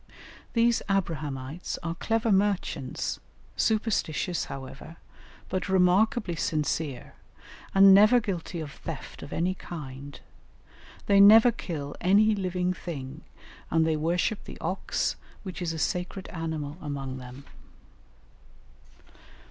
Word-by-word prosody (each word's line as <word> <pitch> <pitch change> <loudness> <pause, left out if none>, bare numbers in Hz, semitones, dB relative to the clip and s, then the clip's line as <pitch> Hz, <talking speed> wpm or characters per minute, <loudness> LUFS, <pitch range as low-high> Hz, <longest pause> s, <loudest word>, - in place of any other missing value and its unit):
These 235 0 +3
"Abrahamites" 155 -5 -2
are 165 -1 -2
clever 225 +5 0
merchants, 190 -9 0 0.4
superstitious, 205 -6 0
however, 135 +4 -9 0.5
but 185 +1 -3
remarkably 190 +2 +3
sincere, 150 -4 -2 0.6
and 195 0 +9
never 215 +5 +7
guilty 180 -5 -4
of 150 -2 -6
theft - - -8
of - - -9
any 175 +3 0
kind; 145 -6 -8 0.9
they 200 -1 +4
never 220 +4 +9
kill 155 -10 -6
any 205 +4 +5
living 185 -2 -1
thing, 140 -8 -7 0.5
and 165 -1 +3
they 160 -1 +1
worship 175 +7 0
the - - -9
ox, - - -2 0.3
which 185 -2 -7
is 170 -2 -1
a 165 - -5
sacred 180 +4 -2
animal 160 -2 -4
among 135 -3 -5
them. 125 +2 -10
175 Hz, 110 wpm, -27 LUFS, 150-195 Hz, 0.9 s, and